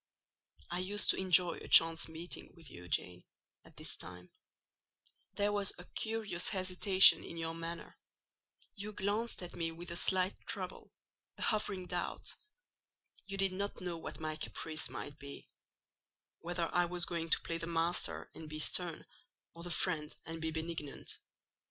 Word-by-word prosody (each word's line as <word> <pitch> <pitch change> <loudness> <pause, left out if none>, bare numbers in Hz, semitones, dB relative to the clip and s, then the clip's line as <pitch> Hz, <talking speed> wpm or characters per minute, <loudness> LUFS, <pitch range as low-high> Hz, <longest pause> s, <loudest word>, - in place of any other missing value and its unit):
I 175 - -1
used 200 +3 +3
to - - -2
enjoy 180 -2 +5
a - - -9
chance 165 0 +7
meeting 165 +3 -6
with 160 -5 -13
you, 90 0 -10
Jane, 90 +1 0 0.4
at - - -19
this - - -1
time: 90 +1 -9 1.0
there 205 +1 +2
was 205 -1 0
a 180 - -10
curious 220 -6 -2
hesitation 185 0 +7
in 170 - -7
your 165 0 -2
manner: 165 0 -6 0.7
you 210 +1 -6
glanced 205 +2 -1
at 175 - -7
me 165 -1 -1
with 170 +2 -8
a - - -4
slight 185 +2 +2
trouble—a - - -8
hovering 200 -4 +1
doubt: 180 0 -2 0.9
you 195 0 -4
did 195 -1 +2
not 200 +2 -3
know 180 -2 -3
what - - -6
my 155 -1 -3
caprice 155 0 -2
might 145 - -7
be—whether 165 +4 -8
I 175 0 +4
was 175 0 +1
going 165 -1 -3
to - - +4
play 165 0 -3
the 165 - -4
master 170 +1 -1
and 160 -1 -9
be 155 - -5
stern, 170 +2 +1 0.5
or 170 - -11
the 175 - -5
friend 160 -3 0
and 165 0 -6
be 160 - -1
benignant. 160 -2 -5
170 Hz, 155 wpm, -35 LUFS, 160-185 Hz, 1.0 s, chance